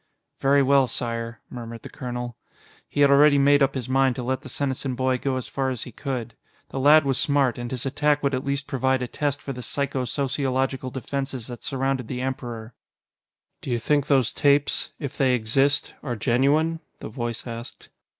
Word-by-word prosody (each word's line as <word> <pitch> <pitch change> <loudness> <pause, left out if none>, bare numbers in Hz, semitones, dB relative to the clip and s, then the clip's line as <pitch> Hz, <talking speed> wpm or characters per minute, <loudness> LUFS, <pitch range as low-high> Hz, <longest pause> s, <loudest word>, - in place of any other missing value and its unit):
"Very 140 +1 +4
well, 135 -1 +4
Sire," 115 0 -3
murmured 115 -1 -7
the - - -8
colonel. 120 -2 -5 0.5
He 145 - -1
had 140 -1 +6
already 145 +1 +6
made 145 +1 +5
up 135 - +3
his 130 -2 -3
mind 130 -1 +3
to 125 - -4
let 130 +1 -1
the 140 - -10
Senesin 135 0 -2
boy 130 0 +1
go 135 0 -1
as 130 - -5
far 135 -1 -1
as 125 -3 -3
he 125 - -9
could. 120 -1 -4 0.4
The 135 - -4
lad 150 +2 +6
was 135 -2 +1
smart, 140 -4 +2
and 120 0 -4
his 125 0 -3
attack 145 +2 +1
would 140 0 +1
at 130 0 -1
least 140 0 -1
provide 130 -1 0
a - - -3
test 145 +2 -2
for 135 - -4
the 125 - -7
psycho 135 +1 -1
sociological 135 0 -1
defenses 135 -1 -4
that 120 -1 -8
surrounded 135 -2 -1
the 125 0 -4
Emperor. 120 -3 -5 0.9
"Do - - -7
you 120 - +1
think 145 +4 +1
those 135 -5 +3
tapes 145 -1 +2
if 140 -2 -5
they 130 -2 +4
exist 135 +6 +2
are 125 -4 -3
genuine?" 140 +8 +2 0.2
the - - -6
voice 120 0 -4
asked. 115 0 -8
130 Hz, 195 wpm, -24 LUFS, 125-140 Hz, 0.9 s, had